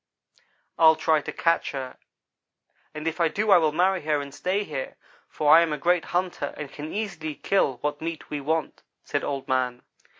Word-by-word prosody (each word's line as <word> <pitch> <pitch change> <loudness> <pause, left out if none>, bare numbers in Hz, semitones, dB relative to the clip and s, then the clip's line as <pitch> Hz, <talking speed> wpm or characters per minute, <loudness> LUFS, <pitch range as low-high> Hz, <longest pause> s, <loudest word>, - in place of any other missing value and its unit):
"'I'll 160 -1 +7
try 155 -1 +2
to - - -6
catch 165 -2 0
her, 130 -2 -6 0.9
and 155 +1 -6
if 165 +2 -2
I 165 - +5
do 210 +6 0
I 190 - +8
will 155 -2 +2
marry 180 +3 +2
her 150 -1 0
and 140 -1 -7
stay 190 +7 -1
here, 145 -8 -5 0.3
for 150 0 +4
I 165 - +8
am 165 -2 +1
a 150 - -1
great 175 +3 +1
hunter 175 -5 -2
and 145 -2 -7
can 150 +2 -7
easily 175 -8 -4
kill 190 -9 +1
what 145 0 -2
meat 165 0 -6
we 145 -1 -3
want,' 160 +2 -2 0.2
said - - -2
Old 140 -2 -3
man. 125 -1 -1
155 Hz, 195 wpm, -25 LUFS, 145-175 Hz, 0.9 s, I